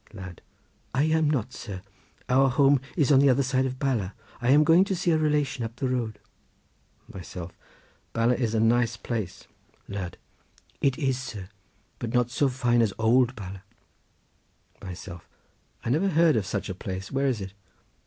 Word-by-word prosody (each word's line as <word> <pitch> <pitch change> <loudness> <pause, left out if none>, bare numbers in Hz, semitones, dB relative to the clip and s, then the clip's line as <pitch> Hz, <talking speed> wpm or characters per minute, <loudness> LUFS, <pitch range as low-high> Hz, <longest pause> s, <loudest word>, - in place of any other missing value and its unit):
Lad.—I 95 - -6
am 160 -1 +2
not, 130 -4 -1
sir; 100 -4 -7 0.4
our 135 +1 +4
home 135 +1 +4 0.2
is 150 -3 +3
on 135 - +7
the 140 0 +5
other 135 +2 +3
side 130 0 +1
of 130 0 -5
Bala. 120 -9 -1 0.3
I 120 - +1
am 145 +3 +7
going 165 +4 +6
to 195 - -1
see 175 0 +1
a 160 - +4
relation 150 -5 0
up 115 0 -5
the 130 +2 -2
road. 120 -4 -2 1.0
Myself.—Bala 95 +6 -4
is 115 -3 -1
a - - +2
nice 115 +1 +2
place. 110 -7 -4 0.4
Lad.—It 100 +7 -5
is, 135 -4 0
sir; 105 -7 -7 0.5
but 115 0 -3
not 120 -1 +2
so 140 +3 +2
fine 120 -2 +2
as 110 -4 +1
old 120 +3 +3
Bala. 95 -2 -8 1.2
Myself.—I 90 +5 -9
never 165 +9 +2
heard 165 -3 +4
of 105 -4 0
such 100 - -2
a 95 - -3
place. 95 0 -6
Where 135 +1 +1
is 125 -5 0
it? 95 -1 -7
125 Hz, 160 wpm, -26 LUFS, 105-140 Hz, 1.2 s, on